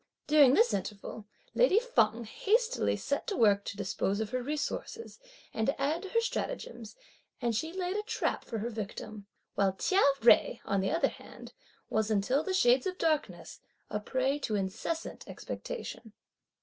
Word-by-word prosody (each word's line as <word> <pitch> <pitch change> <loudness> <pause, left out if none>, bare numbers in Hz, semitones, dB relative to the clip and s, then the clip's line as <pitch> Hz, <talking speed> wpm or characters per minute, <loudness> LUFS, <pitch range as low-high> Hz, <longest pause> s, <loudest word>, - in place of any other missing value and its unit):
During 290 -3 +6
this 465 +2 +4
interval 205 +1 -5 0.3
lady - - +4
Feng 235 - +1
hastily 450 - +1
set - - -2
to 400 - -2
work 200 -3 +4
to 200 - -5
dispose 200 0 -1
of 220 -1 -3
her 255 0 -1
resources, 300 - -4 0.3
and 220 - -1
to 275 - 0
add 300 +5 0
to 390 - -7
her 460 - +2
stratagems, 240 - -4 0.4
and 235 -2 0
she 320 +9 -2
laid 365 +1 -3
a 420 - 0
trap 425 - -2
for 225 - -5
her 230 +3 -3
victim; 215 -1 -7 0.3
while 195 -1 +2
Chia 375 - +2 0.2
Jui, 235 - +5
on 195 -1 +1
the 195 - 0
other 330 - +2
hand, - - -12 0.4
was 220 0 +1
until 220 +7 +2
the 380 - -3
shades 250 -5 +4
of 365 0 -4
darkness 310 -3 -1 0.3
fell, - - -1
a - - -4
prey 260 +6 0
to 220 -6 -2
incessant 210 - -3
expectation. 220 -3 -7
250 Hz, 170 wpm, -30 LUFS, 215-335 Hz, 0.4 s, During